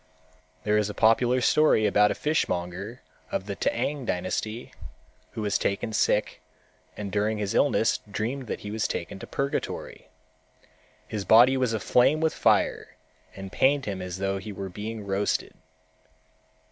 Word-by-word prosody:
There 105 0 +2
is 105 -1 0
a 105 - -6
popular 120 +3 +3
story 135 -5 +4
about 105 0 +4
a - - -1
fishmonger 100 - -2 0.3
of - - -2
the - - -4
T'ang 145 -2 -1
dynasty 110 +5 -3 0.6
who 110 - -4
was 105 -1 +1
taken 100 +2 -1
sick 105 0 +1 0.6
and 100 -2 -5
during 105 +2 0
his 105 0 -2
illness 125 -5 +2
dreamed 115 +6 -3
that - - -4
he 105 - -6
was 110 0 -1
taken 100 - -5
to - - -9
purgatory. 140 0 -4 1.0
His 105 -2 -4
body 120 +7 +6
was 130 -3 +1
aflame 125 +6 +3
with 160 0 +1
fire - - +1 0.4
and 95 -1 -8
pained 135 +2 +2
him 100 -3 -4
as 90 0 -5
though 95 0 -1
he 105 - -7
were 95 -1 -6
being 105 +3 -6
roasted. 100 +1 -1
105 Hz, 150 wpm, -26 LUFS, 100-125 Hz, 1.0 s, body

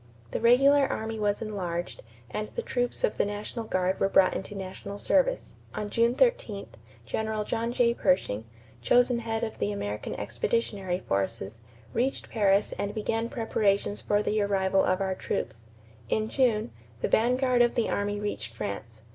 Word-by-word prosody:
The - - -2
regular 275 +4 +6
army 220 -3 -3
was 205 +1 0
enlarged 180 -5 -4 0.3
and 215 0 -3
the 475 - -2
troops 245 - -1
of - - +1
the - - +5
national 205 +3 -5
guard 185 -2 0
were 195 - +2
brought 190 -1 +5
into 205 +2 -5
national 195 +1 -6
service. - - +1 0.2
On 205 -1 -4
June 235 +1 +3
13, 250 - +1 0.4
General 220 +4 -2
John 230 +2 -2
J. 240 -1 +3
Pershing, 180 - +1 0.4
chosen 245 - +4
head 225 0 -2
of 220 - -4
the 100 - 0
American 100 +1 -4
Expeditionary 185 - -1
Forces, 100 +2 -2 0.3
reached 255 +4 -1
Paris 200 -2 +3
and 205 +1 -2
began 225 +2 -1
preparations 205 -4 0
for 205 0 +1
the 215 0 +1
arrival 195 -1 +2
of 185 +1 +1
our 190 -1 0
troops. 115 -10 -4 0.4
In 220 0 0
June, 225 - +1 0.3
the - - +1
vanguard 250 +2 +3
of 240 0 +3
the 235 - +1
army 205 0 -1
reached 205 - -4
France. 110 +1 -6
210 Hz, 160 wpm, -28 LUFS, 190-230 Hz, 0.4 s, regular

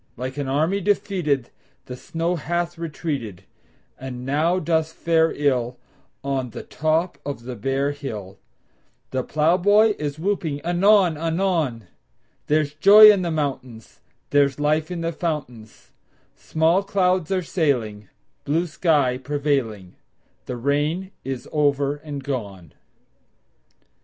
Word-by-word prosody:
Like 130 +2 -5
an 145 -2 -3
army 160 +9 0
defeated 180 - 0 0.3
The 125 - -7
snow 165 +6 -2
hath 175 +1 -2
retreated, 150 - -5 0.6
And 125 -1 -7
now 155 +6 +1
doth 160 -2 0
fare 165 -1 +2
ill 125 -4 0 0.5
On 135 -2 -2
the - - -8
top 155 0 -1
of 140 -4 -6
the 125 0 -6
bare 135 +2 -1
hill; 105 -9 -7 0.7
The 130 - 0
plowboy 185 - +3
is 145 -1 -3
whooping 165 -5 -2
anon 180 -1 +4
anon: 165 - -1 0.6
There's 150 -1 +1
joy 210 +7 +9
in 200 -3 +1
the 175 - -2
mountains; 130 -7 -4 0.3
There's 140 -1 +3
life 155 +1 +1
in 175 -2 -4
the 165 0 -1
fountains; 145 -10 -5 0.4
Small 160 +4 +1
clouds 185 -4 +1
are 185 -1 0
sailing, 120 - -1 0.3
Blue 160 +5 0
sky 145 -6 +1
prevailing; 130 -9 -2 0.5
The 125 - -4
rain 145 +9 -1
is 130 -2 -5
over 145 -1 +1
and 145 -2 -7
gone! 100 - -5
150 Hz, 120 wpm, -23 LUFS, 130-170 Hz, 0.7 s, joy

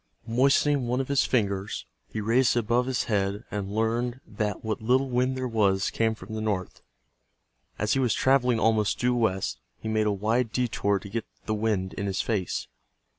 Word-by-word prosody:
Moistening 135 +3 +3
one 125 +2 0
of 135 - -2
his 140 -1 +3
fingers, 100 -5 -1 0.3
he - - -3
raised 120 +4 +3
it - - +4
above 120 +3 +1
his 130 0 0
head 100 -2 -1
and 100 -1 -3
learned 115 +3 0
that 105 -1 -3
what 110 -1 -2
little 130 +4 +2
wind 125 +1 +1
there 130 0 -2
was 100 -5 +2
came 110 -1 +1
from 110 - -10
the 110 - -3
north. 100 -4 -2 1.0
As 105 +1 +1
he 135 - +1
was 125 -5 +2
traveling 125 -3 +3
almost 110 -2 +2
due 125 0 +2
west, 110 - 0 0.2
he - - -6
made 110 -1 +1
a - - +3
wide 110 +4 0
detour 110 -5 +1
to 100 - -8
get 115 +3 -4 0.2
the 110 - -1
wind 105 -3 -1
in 100 - -3
his 95 - -2
face. 100 -6 -1
110 Hz, 190 wpm, -27 LUFS, 105-125 Hz, 1.0 s, it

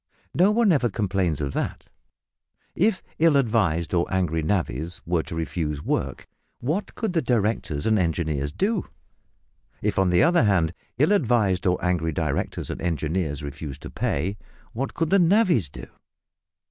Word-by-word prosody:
No 185 +4 +4
one 215 -1 +3
ever 130 -7 +2
complains 95 -6 0
of 70 -1 -2
that. - - -3 0.9
If 200 +2 +1 0.2
ill 160 -3 +5
advised 100 - +1
or 85 -1 +1
angry 90 -4 0
navvies 80 -2 -2
were 85 -1 +1
to 80 - -7
refuse 80 -2 -2
to 70 - -10
work, - - -2 0.3
what 155 +12 -2
could 220 -4 -2
directors 115 - 0
and 110 -2 +3
engineers 80 -5 -1
do? 200 - -1 0.9
If, - - 0
on 95 -1 +3
the 90 - +4
other 170 -5 +4
hand, 90 -5 +2 0.2
ill 150 - +3
advised 115 - +2
or 90 0 +3
angry 80 -3 0
directors 75 -2 -2
and - - -6
engineers 80 -2 -1
refused 70 -1 -7
to - - -7
pay, 95 +8 -2 0.3
what 130 +4 -3
could 165 -1 -1
navvies 175 - +3
do? - - -9
95 Hz, 150 wpm, -24 LUFS, -, 0.9 s, ill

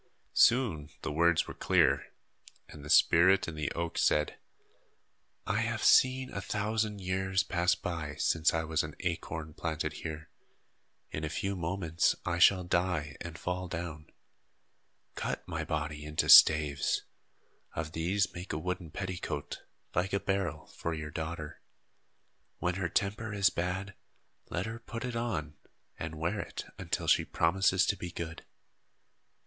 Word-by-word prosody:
Soon 105 - +3
the 80 - -2
words 85 +2 +3
were - - -6
clear, 70 +2 +2 0.6
and 75 -2 -12
the 75 - -9
spirit 95 +6 +5
in 85 - -4
the 75 -2 -3
oak 85 0 -3
said: 75 0 +2 1.1
"I 100 +3 0
have 115 0 -1
seen 130 0 +4
a 100 - -3
thousand 105 0 -1
years 95 0 0
pass 90 -1 +2
by, 80 -4 -4
since 80 0 +2
I 80 0 0
was 80 0 0
an 75 -1 -6
acorn 80 -3 -3
planted 80 -1 -3
here. 80 -1 -6 0.8
In 75 - -4
a 80 - -1
few 100 +6 -2
moments 85 -1 0
I 85 -1 -1
shall 90 +1 +6
die 85 -5 0
and 85 -2 -6
fall 90 0 -3
down. 85 -3 -6 1.1
Cut - - -4
my - - -3
body 75 -1 -3
into 75 +1 -1
staves. 75 -2 +7 0.7
Of 80 -1 -3
these 90 +4 0
make 90 0 -6
a - - -1
wooden 90 0 -4
petticoat, 90 -5 -5 0.3
like 95 +3 0
a 100 - +2
barrel, 95 -7 -2
for 85 -1 -4
your 75 -1 -6
daughter. 80 -2 -5 1.0
When 90 - 0
her 90 -1 -2
temper 105 +4 -1
is 100 -1 +4
bad, 95 +3 -3 0.6
let 85 - -2
her 115 +1 -5
put 115 +1 -6
it 125 -1 -4
on 80 -11 -3 0.4
and 80 0 -5
wear 85 +7 -1
it 85 - -6
until - - -2
she - - +4
promises 95 +2 +2
to 105 - +1
be 90 - -6
good." 85 -2 -6
85 Hz, 150 wpm, -31 LUFS, 80-95 Hz, 1.1 s, staves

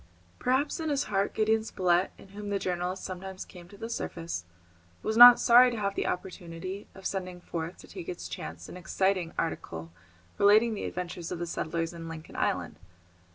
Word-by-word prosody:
Perhaps 265 +5 +1
in 320 -1 -2
his 285 -1 +1
heart 200 -1 -1
Gideon 220 0 +2
Spilett, 180 -3 +1
in - - -15
whom 205 +1 -7
the 200 - +1
journalist 180 0 -2
sometimes 190 0 -6
came 175 -2 -13
to 200 - -14
the 225 - -5
surface, 165 - -4 0.6
was 220 - -1
not 245 +1 +11
sorry 245 +1 +7
to 235 - -4
have 200 -2 -1
the - - -1
opportunity 185 +1 -5
of 190 - -13
sending 185 -2 -3
forth 170 0 -5
to - - -14
take 180 -4 -8
its 175 - -5
chance 85 -1 -7
an - - -9
exciting 185 -1 0
article 80 - -3 0.5
relating 215 +3 +6
the 210 - -4
adventures 175 -1 -5
of 180 - -2
the 175 - -3
settlers 165 0 -2
in 165 -1 -7
Lincoln 160 -1 -9
Island. - - -1
185 Hz, 185 wpm, -29 LUFS, 170-210 Hz, 0.6 s, not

